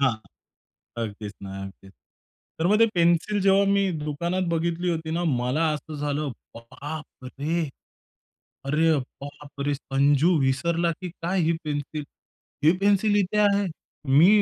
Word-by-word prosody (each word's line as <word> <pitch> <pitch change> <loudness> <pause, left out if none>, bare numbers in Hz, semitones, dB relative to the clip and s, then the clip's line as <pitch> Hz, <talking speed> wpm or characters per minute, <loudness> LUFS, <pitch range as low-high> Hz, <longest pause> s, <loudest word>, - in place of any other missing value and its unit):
हां. 130 -4 +3 0.9
अगदीच 105 -1 -5
ना, 100 - -7
अगदीच, 95 0 -11 0.7
तर 160 - +1
मग 210 +3 +4
ते 230 - +6
पेन्सिल 170 +4 +2
जेव्हा 195 +1 +5
मी 200 -1 +2
दुकानात 170 +5 -1
बघितली 170 +2 0
होती 160 -1 -3
ना 175 +2 -1
मला 125 +5 0
असं 155 +1 -7
झालं 145 0 -2 0.3
बाप 130 +5 -9
रे! 150 +5 -2 1.0
अरे 155 +4 +3 0.3
बापरे! 145 0 -4
संजू 140 +5 +2
विसरला 165 +6 +1
की 185 - -4
काय 180 +2 -2
ही 160 - +2
पेन्सिल? 150 0 -3 0.6
हे 160 - +7
पेन्सिल 205 +1 +3
इथे 205 +1 +1
आहे. 205 -1 +3 0.5
मी 170 +4 +8
160 Hz, 135 wpm, -25 LUFS, 140-180 Hz, 1.0 s, मी